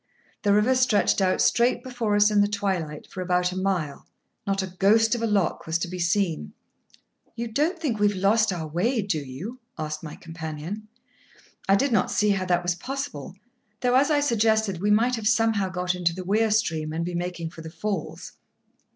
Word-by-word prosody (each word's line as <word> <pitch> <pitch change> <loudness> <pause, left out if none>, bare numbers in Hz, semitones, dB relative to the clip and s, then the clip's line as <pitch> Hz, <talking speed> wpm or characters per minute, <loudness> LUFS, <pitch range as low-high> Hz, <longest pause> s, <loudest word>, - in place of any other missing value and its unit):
The 205 - +2
river 210 +5 +4
stretched 250 -6 +2
out 185 -1 +2
straight 240 +1 +2
before 245 -5 -1
us 205 +1 +5
in 205 -1 +4
the 205 - +3
twilight 190 -7 -2
for 185 - -8
about 180 0 +1
a - - -6
mile; 185 -6 -2 0.4
not 195 -1 0
a 185 -1 -8
ghost 225 +3 +4
of 240 - -1
a 230 - +1
lock 200 -7 0
was 165 0 +1
to 170 - -3
be 180 +1 -6
seen. 175 -1 0 0.8
"You 235 0 -3
don't 300 +11 0
think 280 -10 -2
we 210 - +4
have 205 -1 -1
lost 210 +3 +3
our 170 -3 -3
way, 205 - 0
do 190 -6 -1
you?" 150 - -7 0.2
asked 155 0 -4
my 155 -2 -8
companion. 165 +5 -7 0.8
I 195 - +7
did 270 +6 +1
not 205 -5 +2
see 210 0 +2
how 195 -2 0
that 175 -1 +1
was 175 0 +1
possible; 185 - -6 0.5
though, 250 -1 +2
as 270 +4 +4
I 295 -1 +3
suggested, 220 -7 +1
we 205 - +1
might 235 +4 +3
have 215 -2 -2
somehow 225 -4 +2
got 180 0 -1
into 175 -2 0
the 185 0 -6
weir 215 +4 +2
stream, 165 -8 0
and 165 +1 -2
be 175 - -4
making 175 -1 -4
for 165 - -11
the 160 - -8
falls. 180 +1 -4
195 Hz, 205 wpm, -25 LUFS, 175-225 Hz, 0.8 s, I